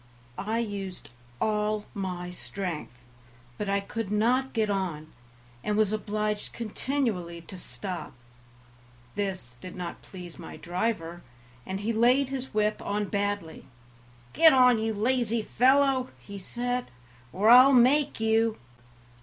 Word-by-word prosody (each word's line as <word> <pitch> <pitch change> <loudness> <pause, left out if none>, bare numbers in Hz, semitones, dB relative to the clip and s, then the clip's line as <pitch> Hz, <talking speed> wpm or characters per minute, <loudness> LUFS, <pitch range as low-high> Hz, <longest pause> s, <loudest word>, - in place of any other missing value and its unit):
I 215 +4 -2
used 200 -5 -4 0.3
all 210 0 0
my 180 -3 -4
strength, 170 -9 -5 0.5
but 205 - -2
I 200 0 +2
could 200 +1 -5
not 245 +5 +2
get 220 -2 +1
on, 175 -6 -3 0.5
and 210 0 0
was 215 -1 +3
obliged 210 0 -2
continually 215 -7 -2
to 180 +4 -11
stop. 185 0 -5 1.0
This 185 -12 -4
did 185 0 -8
not 180 -2 -6
please 180 -3 -10
my 165 - -9
driver, 175 0 -2 0.5
and 190 +1 -3
he 225 +3 -1
laid 250 +4 +4
his 265 -1 -4
whip 210 0 +1
on 205 -1 -2
badly. 205 -5 -2 0.7
"Get 320 -3 +7
on, 250 -3 +6
you 220 0 -1
lazy 230 0 +1
fellow," 260 +2 +3
he 200 -1 -9
said, 245 +5 -3 0.4
"or 210 - +4
I'll 255 +3 +9
make 265 +3 +4
you." 225 0 +2
210 Hz, 130 wpm, -28 LUFS, 190-235 Hz, 1.0 s, I'll